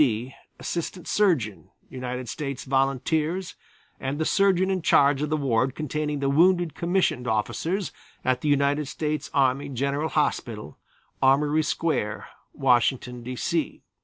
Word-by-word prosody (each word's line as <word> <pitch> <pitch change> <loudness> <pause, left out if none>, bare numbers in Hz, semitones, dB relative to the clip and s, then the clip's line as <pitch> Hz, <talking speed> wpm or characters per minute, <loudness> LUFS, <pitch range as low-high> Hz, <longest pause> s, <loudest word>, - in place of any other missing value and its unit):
D., 125 -1 +1 0.3
Assistant 175 +1 -4
Surgeon, 155 - +1 0.2
United 125 -1 -5
States 140 +3 -4
Volunteers 150 +7 0 0.5
and 135 +2 -3
the 160 - -1
surgeon 190 0 +3
in 185 -1 0
charge 140 -2 +4
of 150 - -1
the 155 - +1
ward 130 -2 +1
containing 150 0 -2
the 140 - +1
wounded 175 +3 +3
commissioned 170 -7 0
officers 125 - -1 0.3
at 130 0 +1
the 150 - 0
United 145 +1 +2
States 150 +1 -3
Army 135 +1 +1
General 140 +4 -1
Hospital, 110 - -2 0.4
Armory 145 +3 +4
Square, 150 -9 -1 0.3
Washington, 125 -1 +1
D. 125 +2 -6
C. 165 +5 -2
140 Hz, 135 wpm, -25 LUFS, 130-160 Hz, 0.5 s, charge